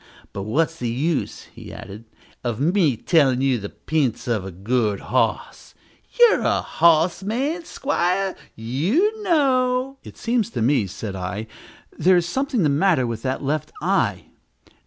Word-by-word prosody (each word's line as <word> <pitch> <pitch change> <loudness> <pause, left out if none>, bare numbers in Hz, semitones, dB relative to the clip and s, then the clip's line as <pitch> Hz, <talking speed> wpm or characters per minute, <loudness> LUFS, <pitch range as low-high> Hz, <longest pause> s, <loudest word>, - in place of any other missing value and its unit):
But 100 - -4
what's 165 +6 0
the 120 -5 -3
use," 145 +7 -2
he - - -11
added, 105 +4 -10 0.4
"of 120 -2 -2
me 160 - +2
tellin' 140 -6 +3
you 135 -3 +2
the 100 0 -6
p'ints 140 -5 -2
of 115 -5 0
a 95 - -6
good 105 +3 -1
hos? - - -2 0.4
You're 475 -2 +6
a - - +1
hos 170 +2 +3
man, 275 - -2
'squire: 195 - -1 0.2
you 200 - 0
know 270 -6 +1
" - - -47
"It - - -12
seems 230 -2 0
to - - 0
me," 125 -4 +2
said 100 +1 -6
I, 95 +4 -4 0.5
"there 180 +3 +5
is 175 - +1
something 260 +2 -1
the - - +3
matter 150 -2 +2
with 115 -2 -4
that 130 +3 -3
left 145 +1 -2
eye." - - 0
155 Hz, 155 wpm, -22 LUFS, -, 0.5 s, You're